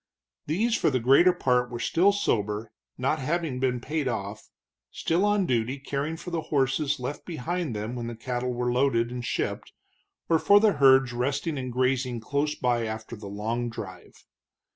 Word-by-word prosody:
These 220 Hz, +10 st, +1 dB
for -, -, +2 dB
the 130 Hz, -3 st, 0 dB
greater 135 Hz, +10 st, +6 dB
part 125 Hz, -8 st, +1 dB
were 120 Hz, 0 st, -6 dB
still 180 Hz, +10 st, +3 dB
sober, 105 Hz, -, -1 dB, 0.3 s
not 135 Hz, +5 st, 0 dB
having 150 Hz, -1 st, -2 dB
been 125 Hz, -1 st, 0 dB
paid 150 Hz, +2 st, -2 dB
off, 110 Hz, -3 st, -4 dB, 0.4 s
still 170 Hz, +4 st, 0 dB
on 205 Hz, -2 st, +2 dB
duty 125 Hz, -1 st, 0 dB
caring 140 Hz, +3 st, -3 dB
for 175 Hz, -, -8 dB
the 165 Hz, -1 st, -1 dB
horses 140 Hz, +1 st, +1 dB
left 125 Hz, +4 st, -5 dB
behind 170 Hz, -3 st, -3 dB
them 105 Hz, +3 st, -4 dB
when 120 Hz, -1 st, -4 dB
the 120 Hz, -, -5 dB
cattle 125 Hz, +2 st, -3 dB
were 125 Hz, 0 st, -1 dB
loaded 120 Hz, -2 st, +2 dB
and 125 Hz, -1 st, -5 dB
shipped, -, -, -3 dB, 0.5 s
or 165 Hz, -1 st, +3 dB
for 205 Hz, +5 st, +6 dB
the 215 Hz, -1 st, +4 dB
herds 135 Hz, -2 st, +5 dB
resting 140 Hz, +6 st, -1 dB
and 130 Hz, -2 st, -4 dB
grazing 130 Hz, -1 st, 0 dB
close 145 Hz, +6 st, -1 dB
by 120 Hz, -2 st, 0 dB
after 110 Hz, +1 st, -6 dB
the 105 Hz, -2 st, -9 dB
long 115 Hz, +4 st, -2 dB
drive. 95 Hz, -5 st, -10 dB
130 Hz, 175 wpm, -27 LUFS, 120-155 Hz, 0.5 s, greater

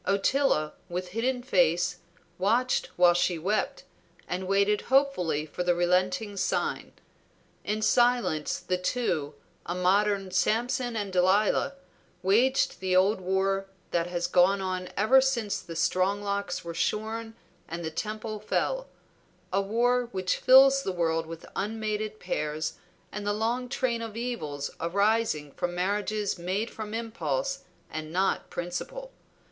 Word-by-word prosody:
Ottila, 200 Hz, -, +2 dB, 0.2 s
with 180 Hz, +1 st, -4 dB
hidden 245 Hz, +5 st, -1 dB
face, 180 Hz, -5 st, +2 dB, 0.4 s
watched 235 Hz, +6 st, +2 dB
while 175 Hz, -1 st, +6 dB
she 175 Hz, 0 st, +1 dB
wept, 195 Hz, +7 st, -1 dB, 0.4 s
and 185 Hz, +1 st, -3 dB
waited 200 Hz, +2 st, +2 dB
hopefully 250 Hz, -, +2 dB
for 170 Hz, -, -6 dB
the 175 Hz, -1 st, +2 dB
relenting 185 Hz, +4 st, +1 dB
sign. -, -, -1 dB, 0.7 s
In 215 Hz, +1 st, -2 dB
silence 240 Hz, -11 st, +2 dB
the 180 Hz, 0 st, -2 dB
two, 175 Hz, -, -1 dB, 0.3 s
a 175 Hz, -, -4 dB
modern 195 Hz, +1 st, +2 dB
Samson 240 Hz, +4 st, +1 dB
and 205 Hz, -3 st, -3 dB
Delilah, 195 Hz, +8 st, +3 dB, 0.5 s
waged 240 Hz, +8 st, +3 dB
the 185 Hz, -1 st, 0 dB
old 190 Hz, +2 st, +3 dB
war 195 Hz, +1 st, 0 dB, 0.2 s
that 170 Hz, 0 st, +1 dB
has 175 Hz, -1 st, -2 dB
gone 185 Hz, +3 st, +4 dB
on 185 Hz, -1 st, -3 dB
ever 240 Hz, +6 st, +6 dB
since 240 Hz, -6 st, 0 dB
the 170 Hz, -2 st, -9 dB
strong 185 Hz, +4 st, +1 dB
locks 200 Hz, -3 st, -2 dB
were 170 Hz, -, -5 dB
shorn 225 Hz, +5 st, -2 dB, 0.3 s
and 170 Hz, +1 st, -5 dB
the 160 Hz, -, -3 dB
temple 215 Hz, +4 st, -4 dB
fell; -, -, -1 dB, 0.7 s
a 195 Hz, -, +3 dB
war 240 Hz, +4 st, +1 dB
which 185 Hz, -3 st, -1 dB
fills 270 Hz, +1 st, +7 dB
the 195 Hz, -, -2 dB
world 165 Hz, -2 st, 0 dB
with 165 Hz, 0 st, -8 dB
unmated 215 Hz, 0 st, -3 dB
pairs 150 Hz, +1 st, -2 dB, 0.4 s
and 210 Hz, -, -5 dB
the 205 Hz, -, +2 dB
long 235 Hz, +4 st, -1 dB
train 245 Hz, -3 st, -1 dB
of 225 Hz, -1 st, -6 dB
evils 155 Hz, -, -3 dB
arising 200 Hz, -4 st, +1 dB
from 175 Hz, +5 st, -3 dB
marriages 205 Hz, +1 st, -1 dB
made 190 Hz, +6 st, -2 dB
from 215 Hz, 0 st, -6 dB
impulse, 230 Hz, -, -2 dB, 0.3 s
and 155 Hz, 0 st, -5 dB
not 190 Hz, +3 st, 0 dB
principle. -, -, -5 dB
200 Hz, 135 wpm, -28 LUFS, 180-225 Hz, 0.7 s, fills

